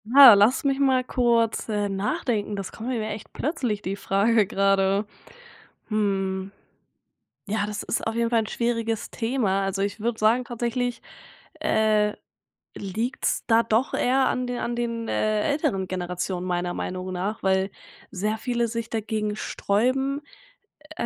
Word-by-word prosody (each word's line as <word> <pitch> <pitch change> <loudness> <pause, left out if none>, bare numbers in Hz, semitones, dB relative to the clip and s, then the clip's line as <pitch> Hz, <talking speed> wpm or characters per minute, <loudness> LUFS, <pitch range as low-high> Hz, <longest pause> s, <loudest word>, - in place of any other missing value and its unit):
Ah, 275 -5 +12
lass 215 +9 +4
mich 275 0 +1
mal 260 -2 +3
kurz, 235 -3 +1
äh, 205 -1 0
nachdenken, 205 +2 -1
das 195 -2 -5
kommt 230 +3 -6
nämlich 220 -4 -2
echt 210 0 -8
plötzlich, 250 -9 -2
die 190 +2 -3
Frage 205 +2 +2
gerade. 195 +1 +2 0.8
Hm. 195 -2 -1 1.0
Ja 205 0 0
das 210 -1 -4
ist - - -2
auf 225 - -1
jeden 230 0 +1
Fall 230 -1 +4
'n 215 - -5
schwieriges 230 -2 -1
Thema. 225 -5 0
Also, 195 0 -2
ich 200 +2 -2
würde 225 +1 -2
sagen 230 +4 +3
tatsächlich, 240 +1 -2 0.6
äh, 215 -1 +2 0.6
liegt's 220 +6 -2
da 230 0 +5
doch 230 +3 +1
eher 260 +2 +2
an 255 - 0
den 245 0 -3
an 240 0 -2
den, 230 -1 -3
äh, 215 -1 +1
älteren 275 - 0
Generationen 180 0 -3
meiner 175 0 -1
Meinung 185 0 -4
nach, 195 +5 -3
weil 190 0 +2 0.4
sehr 210 +4 -1
viele 240 -2 0
sich 230 0 -4
dagegen 215 -1 -2
sträuben, 255 +8 0 0.8
äh, - - -1
220 Hz, 150 wpm, -25 LUFS, 195-240 Hz, 1.0 s, Ah